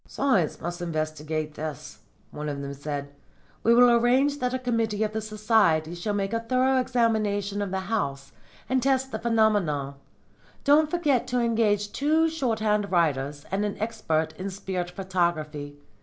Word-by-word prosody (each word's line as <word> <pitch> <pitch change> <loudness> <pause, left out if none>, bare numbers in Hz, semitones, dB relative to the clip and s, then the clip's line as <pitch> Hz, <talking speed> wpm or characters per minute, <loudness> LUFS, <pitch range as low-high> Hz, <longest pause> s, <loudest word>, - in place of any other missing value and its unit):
'Science 210 - +1
must 175 +1 -5
investigate 155 -2 -3
this,' 155 -3 -7 0.3
one 150 0 -5
of 140 -1 -4
them 140 0 -5
said. 140 0 -5 0.5
'We 230 +1 +4
will 245 0 +7
arrange 255 +5 +3
that 250 -2 0
a 260 - 0
committee 230 -4 0
of 215 0 -2
the 220 - -2
Society 210 -7 +2
shall 190 +4 -3
make 200 +1 -2
a 230 - +1
thorough 255 +3 +2
examination 215 -5 0
of 200 - -2
the 190 0 -2
house 140 -10 -3 0.4
and 260 0 +1
test 265 0 +1
the - - -3
phenomena. 205 -12 +1 0.7
Don't 295 +2 +5
forget 290 -8 +1
to 250 -1 0
engage 220 -3 +1
two 310 +7 +2
shorthand 220 - 0
writers 145 -4 0
and 195 +2 0
an 205 -1 -2
expert 165 -8 -1
in 190 +2 -3
spirit 185 -2 -4
photography. 170 -6 -2
205 Hz, 155 wpm, -26 LUFS, 160-235 Hz, 0.7 s, will